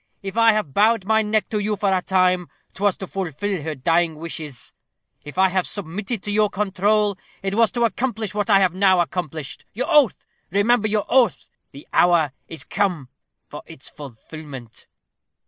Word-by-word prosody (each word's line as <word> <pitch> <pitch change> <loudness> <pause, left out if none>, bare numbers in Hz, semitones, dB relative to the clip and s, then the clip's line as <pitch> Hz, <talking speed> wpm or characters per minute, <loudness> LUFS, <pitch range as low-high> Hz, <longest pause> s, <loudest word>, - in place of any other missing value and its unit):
If 195 0 -5
I 230 -1 +5
have 210 -10 -2
bowed 215 -1 +3
my 220 +1 +3
neck 215 0 0
to 215 - -1
you 210 +1 -1
for 200 -1 +1
a 185 - 0
time, 185 -1 +2 0.3
'twas 200 -1 0
to 190 - -6
fulfil 190 0 -3
her 155 +1 -4
dying 165 +4 +1
wishes. 155 -4 -6 0.5
If 145 +4 -10
I 190 0 +5
have 185 0 0
submitted 200 +3 -5
to 205 - -3
your 210 0 +3
control, 205 0 +1 0.2
it 195 0 -2
was 225 +1 +4
to 235 -1 +2
accomplish 225 -3 -2
what 205 +1 -2
I 195 -2 +6
have 185 -3 +2
now 190 -1 +4
accomplished. 160 -4 -3
Your 255 - -3
oath! 290 - +4 0.2
Remember 215 +4 +2
your 210 0 0
oath. 235 - +2 0.2
The 140 - -13
hour 170 -5 +4 0.2
is 165 - -7
come 175 -10 -1 0.4
for - - -9
its - - -10
fulfilment." 135 -2 -10
195 Hz, 175 wpm, -22 LUFS, 165-210 Hz, 0.5 s, I